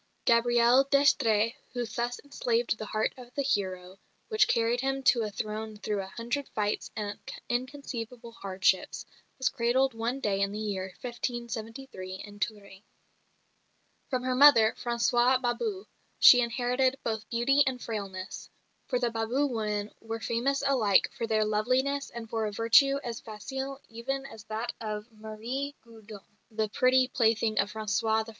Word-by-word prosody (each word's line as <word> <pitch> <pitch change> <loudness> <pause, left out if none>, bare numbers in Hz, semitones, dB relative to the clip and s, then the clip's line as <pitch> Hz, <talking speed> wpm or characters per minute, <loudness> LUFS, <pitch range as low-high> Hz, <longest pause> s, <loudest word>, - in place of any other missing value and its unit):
Gabrielle 240 +2 +5
d'Estrées 230 -6 +3 0.2
who 245 -1 -2
thus 240 +1 -3
enslaved 240 -5 0
the 215 - -5
heart 215 +1 -1
of 245 -1 -12
the 280 - 0
hero, 190 -6 -2 0.3
which 435 -2 +4
carried 235 +1 +1
him 270 0 -1
to 240 -2 +4
a 215 - -2
throne 215 +1 -5
through 205 -1 -2
a 190 - -7
hundred 235 +7 -4
fights 210 -1 -1
and 205 -1 -4 0.3
inconceivable 245 -2 -4
hardships, 190 -3 0 0.3
was 260 - 0
cradled 255 +2 +1
one 230 +4 -2
day 200 -6 0
in 200 0 +1
the 210 - -5
year 205 -3 -2 0.2
1573 235 -4 -5
in 205 +1 -10
Touraine. 200 -3 -5 1.3
From 255 -2 -1
her 255 0 0
mother, 250 -5 +7
Françoise 240 +1 +3
Babou, 380 - -2 0.3
she 245 - +8
inherited 250 +3 +1
both 220 -1 -3
beauty 255 +4 +3
and 255 -1 -1
frailness; 195 -5 -6 0.4
for 250 - 0
the 240 -1 0
Babou 230 +6 0
women 210 -2 -2
were 225 0 -5
famous 265 +5 0
alike 225 -8 +3
for 230 - -3
their 215 -1 +2
loveliness 255 +7 0
and 235 -1 -8
for 220 -1 -1
a - - -4
virtue 230 +6 +4
as 235 -2 -4
facile 265 +5 -6
even 270 +4 -4
as 220 -5 -11
that 220 +2 -4
of 215 +1 -5
Marie 225 +6 -5
Gaudin, 220 -3 -12 0.3
the 215 -1 -2
pretty 255 +3 +3
plaything 225 -3 +1
of 200 - +1
François 220 +1 0
I. - - -8
230 Hz, 150 wpm, -29 LUFS, 215-255 Hz, 1.3 s, she